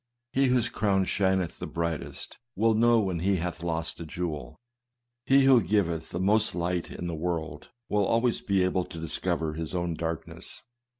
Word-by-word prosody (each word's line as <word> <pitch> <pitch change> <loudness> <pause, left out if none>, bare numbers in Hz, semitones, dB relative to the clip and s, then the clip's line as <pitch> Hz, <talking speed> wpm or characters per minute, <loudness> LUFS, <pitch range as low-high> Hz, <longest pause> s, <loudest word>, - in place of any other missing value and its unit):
He 135 +1 +3
whose 125 -2 +3
crown 100 -5 +1
shineth 95 -2 0
the - - -4
brightest, 85 -2 -4 0.2
will 115 +3 +3
know 115 +1 +4
when 95 -5 -1
he 95 +3 +2
hath 85 -1 -3
lost 80 -1 -2
a - - -4
jewel. 80 -3 -5 0.7
He 135 0 +6
who 135 -3 +6
giveth 85 -4 0
the 85 - -4
most 105 +1 +3
light 85 0 -1
to - - -10
the 85 -1 -3
world, 80 0 -3 0.2
will 105 -1 +2
always 115 +1 +2
be 100 -2 +2
able 90 -1 +1
to - - -10
discover 80 0 -2
his 80 +2 -4
own 85 -1 -1
darkness. 80 -1 -5
90 Hz, 175 wpm, -28 LUFS, 85-105 Hz, 0.7 s, He